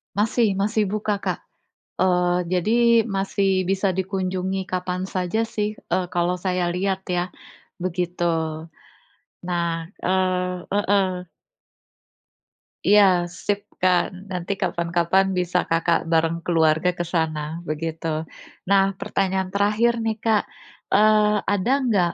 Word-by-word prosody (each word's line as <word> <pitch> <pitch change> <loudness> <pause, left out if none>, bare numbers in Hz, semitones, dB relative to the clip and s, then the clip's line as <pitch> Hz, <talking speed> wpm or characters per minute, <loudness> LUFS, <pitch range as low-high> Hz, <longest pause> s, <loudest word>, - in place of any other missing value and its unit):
Masih 215 0 +2
masih 210 +1 +1
buka, 210 0 -1
Kak. - - -3 0.6
Eee, 180 -1 +2 0.2
jadi 185 +5 +1 0.3
masih 195 -1 0
bisa 190 0 0
dikunjungi 190 0 -2
kapan 185 0 -3
saja 190 +5 -1
sih, 210 -1 -3
eee, 185 - 0
kalau 175 +1 +1
saya 180 -1 -1
lihat 190 +2 -2
ya, 180 0 -1 0.5
begitu. 180 -1 -2 1.3
Nah 170 -2 -1 0.2
eee, 180 -1 0
heeh. 195 -3 +1 1.6
Iya, 205 0 +7 0.4
sip 205 0 +1 0.2
kan. 180 -1 +3 0.2
Nanti 180 0 -3
kapan-kapan 170 +2 +1
bisa 180 0 0
Kakak 165 +1 +2
bareng 165 +1 +2
keluarga 160 0 +3
ke - - +1
sana 160 -2 0 0.3
begitu. 160 +1 -4 0.6
Nah, 195 -1 +5 0.2
pertanyaan 190 -1 -1
terakhir 210 +4 +2
nih, 220 -1 -1
Kak, 220 -2 +3 0.5
eee, 210 0 +5 0.2
ada 205 +5 0
nggak 185 -7 +2
185 Hz, 110 wpm, -23 LUFS, 175-200 Hz, 1.6 s, Iya